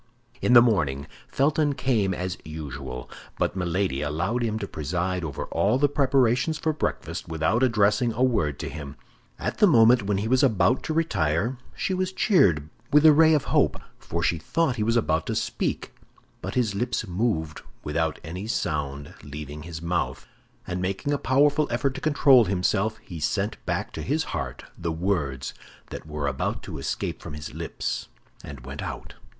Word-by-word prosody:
In 125 - +3
the 120 -1 +10
morning, 75 - +1 0.2
Felton 145 +1 +2
came 120 -7 +1
as 90 -1 -3
usual; 70 -5 -7 0.3
but - - 0
Milady 90 -5 -1
allowed 85 +11 -1
him 110 -2 0
to 100 -2 -4
preside 90 +4 -2
over 75 -4 -4
all 125 - +2
the 145 +2 +4
preparations 135 +1 +2
for 155 - 0
breakfast 155 - -3
without 85 +8 0
addressing 115 -1 +3
a 120 +4 0
word 80 - +1
to - - -4
him. 70 -2 -7 0.4
At - - -4
the 210 - +7
moment 120 - +6
when 100 0 0
he 105 +3 -1
was 130 +2 +3
about 125 0 +3
to 155 - -1
retire, 110 - 0 0.2
she 190 - -1
was 185 0 -1
cheered 95 - +3 0.2
with 150 +2 +5
a 155 - +9
ray 160 +1 +6
of 145 - +1
hope, - - +3 0.2
for 85 0 -3
she 85 - +1
thought 155 - 0
he - - -2
was 115 +2 +2
about 80 -8 +1
to - - -1
speak; - - -2 0.5
but - - -5
his 120 -5 +1
lips 120 +5 -1
moved 90 -5 -1 0.2
without 80 +1 -1
any 90 +6 -6
sound 70 -9 -2
leaving 75 +1 -8
his 80 0 -8
mouth, 85 +1 -2 0.4
and 90 0 -3
making 95 +10 -1
a 145 - 0
powerful 145 +3 +3
effort 125 +3 0
to 135 - -7
control 140 -5 +5
himself, 100 +3 0
he 85 -3 -8
sent 75 - -1
back - - -1
to - - -5
his 155 +4 0
heart - - -4
the 85 0 -3
words 80 -7 -2 0.4
that - - -7
were 75 -1 -3
about 65 -2 -2
to - - -7
escape - - -3
from 75 - -8
his 75 - -7
lips, - - -4 0.4
and 70 -3 -9
went 70 +2 -6
out. - - -6
100 Hz, 180 wpm, -25 LUFS, 80-130 Hz, 0.5 s, the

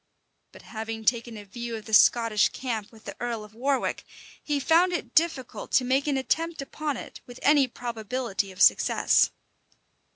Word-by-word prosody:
But - - -15
having 225 0 -6
taken 235 -1 0
a 205 - -10
view 235 +4 -6
of 220 - -8
the 220 - -9
Scottish 230 -1 +5
camp 225 -5 -5
with 220 -2 -17
the - - -7
earl 235 -3 -3
of 210 0 -14
Warwick, 265 +4 -1 0.4
he 295 -1 -1
found 330 +6 +3
it 345 - -4
difficult 320 -6 0
to 255 - +4
make 265 +3 +1
an 280 -2 +1
attempt 330 +5 -1
upon 290 0 -4
it - - -10
with 245 0 -11
any 285 -2 +5
probability 235 -4 -4
of 185 - -15
success. - - +4
245 Hz, 170 wpm, -26 LUFS, 220-275 Hz, 0.4 s, Scottish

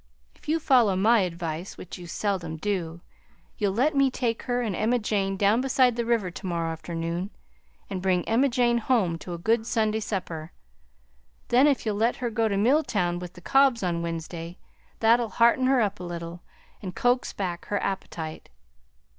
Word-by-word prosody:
If - - -13
you 325 +1 +2
follow 245 -10 +4
my 220 +5 +4
advice, 170 -1 -3
which 180 - -9
you 175 - -9
seldom 170 -4 -2
do, 170 -3 -3 0.6
you'll 200 -3 0
let 285 +6 +2
me 275 -1 +4
take 235 -3 -2
her 245 0 +1
and 210 -5 -2
Emma 230 +6 +1
Jane 200 -3 -1
down 205 +5 +3
beside 255 -2 +3
the 235 -1 -1
river 225 -6 +1
to 190 - -9
morrow 170 -2 -1
afternoon 170 +3 -4 0.6
and 190 -2 -4
bring 180 -2 +1
Emma 250 +5 +3
Jane 240 -1 +2
home 210 -9 +1
to 175 0 -6
a - - -6
good 220 +6 +1
Sunday 220 -2 +1
supper. 175 -7 -5 1.0
Then 255 +4 +5
if 280 -5 +1
you'll 210 -2 -1
let 230 +3 +2
her 245 -3 -3
go 225 0 +1
to 200 -2 -1
Milltown 205 - +2
with 180 0 -8
the 180 - -14
Cobbs 270 +1 +3
on 170 -2 -1
Wednesday, 165 +1 -5 0.4
that'll 230 +1 +4
hearten 235 +3 +3
her 265 -2 +4
up 205 -1 -1
a - - -7
little 170 0 -6 0.4
and 185 -3 -6
coax 245 +1 +1
back 175 -3 -4
her 205 - -1
appetite. 165 -5 -5
205 Hz, 180 wpm, -26 LUFS, 175-235 Hz, 1.0 s, Then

